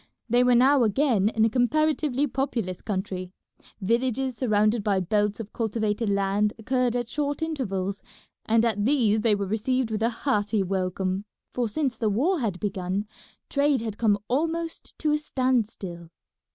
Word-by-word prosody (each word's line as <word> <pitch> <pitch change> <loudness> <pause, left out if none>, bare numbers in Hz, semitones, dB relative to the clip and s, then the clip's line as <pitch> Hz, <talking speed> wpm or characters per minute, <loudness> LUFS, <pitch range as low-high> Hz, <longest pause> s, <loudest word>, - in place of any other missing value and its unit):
They 245 +1 +4
were 250 -1 +4
now 265 +3 +5
again 220 -2 +2
in 220 -1 +2
a - - +3
comparatively 290 +2 +1
populous 240 -9 -2
country; 190 -3 -3 0.5
villages 250 +5 0
surrounded 215 -2 +2
by 200 -2 +2
belts 205 +3 0
of 215 -2 -7
cultivated 220 -1 -1
land 200 +1 +1
occurred 250 +1 0
at 240 -1 -1
short 290 +3 -2
intervals, 200 - -2 0.5
and 225 +1 +3
at 210 -3 0
these 225 -4 +3
they 215 -1 +3
were 200 -1 -2
received 225 +4 -1
with 215 0 -2
a 230 - +3
hearty 215 -4 0
welcome, 190 +1 -2 0.3
for 245 -2 0
since 270 +2 -2
the 220 - +1
war 305 - +1
had 205 -8 -2
begun 195 0 -2 0.4
trade 280 -3 +2
had 220 -2 -5
come 210 -3 +3
almost 330 +5 -2
to 305 - 0
a 300 - +2
stand 255 -6 +1
still. 170 -6 -9
225 Hz, 160 wpm, -26 LUFS, 205-260 Hz, 0.5 s, now